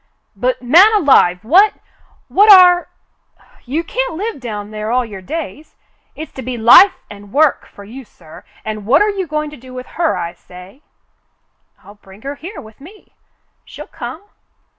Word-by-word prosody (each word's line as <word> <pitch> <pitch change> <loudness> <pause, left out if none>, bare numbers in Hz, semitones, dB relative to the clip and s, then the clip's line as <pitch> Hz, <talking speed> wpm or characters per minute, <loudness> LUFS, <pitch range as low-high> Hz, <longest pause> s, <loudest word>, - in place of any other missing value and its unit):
"But, - - -2
man 345 - +5
alive! 240 - +3
what 385 - +4 0.3
— - - -36
what 415 +2 +7
are 360 -2 +6 0.4
— - - -29
you 320 +4 -1
can't - - -4
live 415 +1 -5
down 210 -4 -7
there 215 0 -6
all 250 +1 0
your 200 -4 -10
days. 310 - -8 0.4
It's 315 - -9
to 265 - -9
be 250 0 -6
life 245 - +6 0.2
and 205 -1 -13
work 300 +2 +1
for 200 - -15
you, 245 +7 -11
sir, 165 -8 -17 0.2
and 215 -1 -6
what 280 - +4
are 420 - 0
you 385 -3 -5
going 305 0 -4
to 300 - -12
do 255 +1 -14
with 255 0 -8 0.2
her, 330 - 0
I 170 0 -5
say?" 180 +9 -16 1.0
"I'll 205 - -15
bring 195 +2 -17
her 280 +1 -5
here 350 +8 -10
with 220 +3 -15
me. 390 +8 -17 0.5
She'll - - -11
come." - - -9
270 Hz, 180 wpm, -16 LUFS, 215-355 Hz, 1.0 s, what